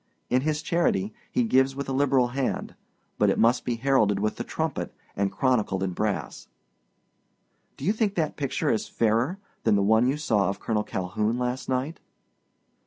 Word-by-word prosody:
In 125 +1 +3
his 150 +1 -1
charity, 175 +5 +1 0.2
he 250 - +2
gives 135 - +3
with 140 0 -4
a 135 - -2
liberal 130 -2 +3
hand; 130 +1 -2 0.5
but - - +4
it - - +1
must 120 +3 +3
be 120 - -1
heralded 115 -5 +2
with 105 +1 -1
the - - -3
trumpet - - -3 0.2
and 100 0 0
chronicled 110 -8 +1
in 95 - -1
brass.' 105 +2 -3 1.3
"Do - - -6
you 205 - +3
think 215 -2 0
that 160 -3 -1
picture 140 -3 -1
is 110 - -1
fairer 115 - +1 0.3
than - - +4
the 100 - +2
one 110 +4 +4
you 135 +3 +1
saw 105 -11 +1
of 100 - -4
Colonel 105 -2 -1
Calhoun 105 +6 -2
last 125 +1 -2
night?" 130 +5 -1
125 Hz, 175 wpm, -26 LUFS, 105-140 Hz, 1.3 s, but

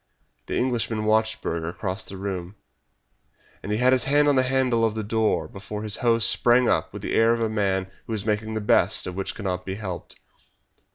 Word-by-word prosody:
The - - -2
Englishman 115 -3 -1
watched 110 +1 +1
Burger 80 0 -2
cross 95 +2 -4
the 95 - -9
room, 95 -1 -5 1.1
and 100 - -5
he 105 - +1
had 125 +2 +4
his 130 - +2
hand 145 +2 +3
on 145 - +4
the 130 - +4
handle 130 -3 +1
of 110 -1 +1
the 110 - -3
door 110 +1 0
before 105 +2 -7
his 105 -1 0
host 115 -2 +3
sprang 120 +1 +4
up - - +1
with - - -8
the - - -3
air 115 +1 +4
of 115 - -1
a 115 - +2
man 100 -3 0 0.2
who 115 - -3
is 105 -2 -3
making 110 0 -1
the 110 - -2
best 105 - +2
of 90 - -4
that - - -10
which 95 - -3
cannot 90 -3 -3
be 95 0 -4
helped. 95 -4 -6
110 Hz, 220 wpm, -24 LUFS, 100-115 Hz, 1.1 s, had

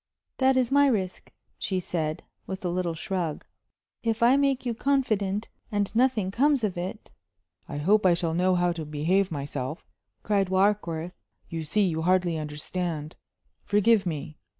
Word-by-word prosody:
"That 260 0 +4
is 255 -1 +2
my 285 +1 +5
risk," 190 -8 -1 0.3
she 190 - -1
said, 160 -3 -3 0.2
with 190 0 -5
a - - +1
little 175 -1 -1
shrug. 170 -2 -3 0.6
"If 225 0 0
I 245 +3 +6
make 275 -2 +1
you 240 - 0
confident, 220 -6 0 0.2
and 205 0 -1
nothing 230 -6 +2
comes 275 +3 +2
of 205 -4 0
it 185 +5 -6 0.3
" 90 -1 -38
"I 145 - -4
hope 200 +8 +3
I 175 - +5
shall 165 -1 -1
know 180 +2 +2
how 175 0 +2
to 170 -2 -4
behave 160 +6 +1
myself," 140 0 -4 0.4
cried 200 -3 +1
Warkworth. 185 -3 +1 0.4
"You 165 -1 -4
see, 205 +7 +2
you 160 -2 -1
hardly 180 0 +2
understand 155 +1 -4 0.5
forgive 205 -1 +3
me! 150 -2 -5
185 Hz, 160 wpm, -27 LUFS, 165-215 Hz, 0.6 s, I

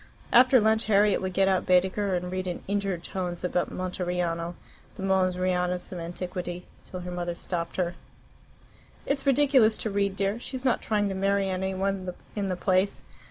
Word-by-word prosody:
After 255 +1 +7
lunch 220 +1 +2
Harriet 205 -1 +4
would 185 0 -2
get 195 +1 +3
out 190 -1 +1
Baedeker, 190 +2 +2
and 180 0 -3
read 185 0 -3
in 175 - -4
injured 195 -3 -1
tones 180 -2 -4
about 180 0 0
Monteriano, 180 -2 -2 0.4
the 190 - -7
Mons 190 -1 +2
Rianus 180 -1 0
of 180 - -5
Antiquity, 175 +1 -5 0.2
till 185 - -6
her 180 0 -6
mother 175 -1 -3
stopped 170 -1 -3
her. 175 -1 0 1.1
"It's 280 0 -1
ridiculous 265 -5 +5
to 220 - -2
read, 200 -1 0
dear. 200 +3 -1
She's 260 +1 -6
not 250 - +2
trying 210 -2 +1
to - - -2
marry 195 0 +1
any 190 +1 -2
one 190 -1 -1 0.2
in 200 -2 -1
the 185 - 0
place. 185 +2 +1
190 Hz, 175 wpm, -27 LUFS, 180-200 Hz, 1.1 s, After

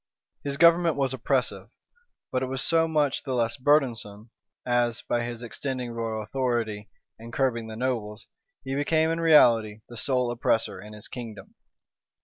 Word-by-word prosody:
His 140 -1 -3
government 170 0 +5
was 135 -2 0
oppressive; 130 0 -1 0.6
but 130 - 0
it 130 - -1
was 135 +1 -2
so 165 -1 +3
much 150 -3 +1
the 130 -2 -3
less 115 0 0
burdensome, 120 -6 0 0.3
as, 120 -2 +1
by 120 - 0
his 120 0 -5
extending 125 +1 -4
royal 115 -2 -3
authority, 115 -4 -2 0.3
and 115 +1 -10
curbing 120 -3 0
the 110 - -7
nobles, 110 -4 -3 0.4
he 135 - -4
became 160 +3 +2
in 165 - -1
reality 115 -10 +5
the 120 - -10
sole 125 0 +1
oppressor 115 -5 0
in 105 +1 -11
his 105 +1 -7
kingdom. 115 -4 -9
125 Hz, 155 wpm, -26 LUFS, 115-140 Hz, 0.6 s, government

